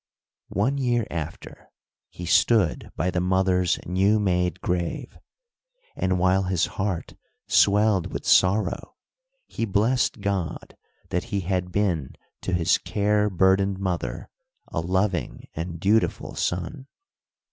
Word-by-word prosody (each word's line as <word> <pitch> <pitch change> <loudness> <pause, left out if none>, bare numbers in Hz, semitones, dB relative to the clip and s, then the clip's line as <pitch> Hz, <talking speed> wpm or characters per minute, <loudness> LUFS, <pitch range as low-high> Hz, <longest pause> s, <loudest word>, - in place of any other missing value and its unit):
One 130 +9 0
year 120 -4 +1
after, 80 -1 -7 0.4
he 90 - -8
stood 100 +2 +2
by 90 +4 0
the 90 - 0
mother's 90 -1 +2
new 95 +4 +2
made 90 -3 0
grave, 90 -2 -3 0.8
and, 95 0 0
while 95 +1 +3
his 90 -3 +1
heart 95 -3 -3 0.3
swelled 105 -2 +3
with - - -5
sorrow, 95 +1 +2 0.5
he - - -5
blessed 110 +2 +1
God 95 -5 -3 0.3
that 90 - -1
he 100 -1 -2
had 90 0 -2
been 90 -8 -1 0.3
to - - -3
his 90 -2 +2
care 105 0 +1
burdened 95 +1 +2
mother 95 -3 -3 0.4
a - - -2
loving 95 +2 -1
and 85 +1 -5
dutiful 105 +5 +1
son. 90 - -3
95 Hz, 120 wpm, -25 LUFS, 90-105 Hz, 0.8 s, while